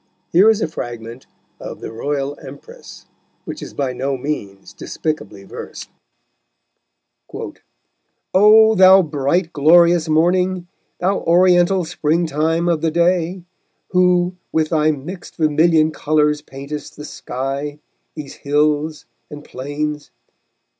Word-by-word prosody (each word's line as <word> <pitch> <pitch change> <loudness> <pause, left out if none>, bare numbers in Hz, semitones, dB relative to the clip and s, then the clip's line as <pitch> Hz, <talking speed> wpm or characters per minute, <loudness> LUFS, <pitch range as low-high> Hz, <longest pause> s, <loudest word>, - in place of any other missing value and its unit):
Here 190 +6 +6
is 220 -1 +2
a - - 0
fragment 120 -4 -8 0.3
of - - -8
The - - -7
Royal 140 +4 -3
Empress, 140 +2 -13 0.4
which - - -7
is - - -9
by 135 -3 -2
no 135 +2 -2
means 105 -8 -6
despicably 110 -11 -5
versed: - - -10 2.4
_O 220 +3 +6
thou 190 0 +7
bright, 160 +3 -1
glorious 170 +2 +4
morning, 180 +3 +1 0.3
Thou 190 +2 0
Oriental 180 +1 +3
spring 160 +2 0
time 160 +3 0
of 165 -3 0
the 165 - +1
day, 170 +2 0 0.5
Who 180 0 +2 0.2
with 155 -1 0
thy 155 -2 +2
mixed 155 +5 -6
vermilion 155 0 +2
colours 150 -1 0
paintest 140 +1 -8
The 150 - -8
sky, 140 +3 -5 0.4
these 150 -3 -8
hills 150 +1 0 0.2
and 145 0 -10
plains! 145 +3 -5
155 Hz, 115 wpm, -19 LUFS, 145-175 Hz, 2.4 s, thou